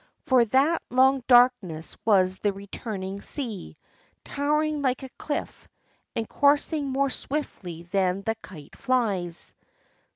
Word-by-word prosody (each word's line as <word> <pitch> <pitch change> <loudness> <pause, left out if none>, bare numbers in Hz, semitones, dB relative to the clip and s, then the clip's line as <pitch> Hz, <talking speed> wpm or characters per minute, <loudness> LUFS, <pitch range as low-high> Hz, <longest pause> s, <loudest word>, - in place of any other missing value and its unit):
For 255 -3 +5
that 275 +8 +2
long 260 +1 +4
darkness 240 -11 +3
was 190 -3 +3
the 205 - +1
returning 195 0 -6
sea, 230 - -5 0.5
towering 300 +1 0
like 260 -1 0
a 265 - -7
cliff, 290 +3 -5 0.5
and 225 -1 -2
coursing 285 +1 +2
more 270 +1 +1
swiftly 190 - -4
than 185 +1 0
the 225 - 0
kite 150 -6 -12
flies. 200 -10 -1
240 Hz, 120 wpm, -26 LUFS, 190-275 Hz, 0.5 s, For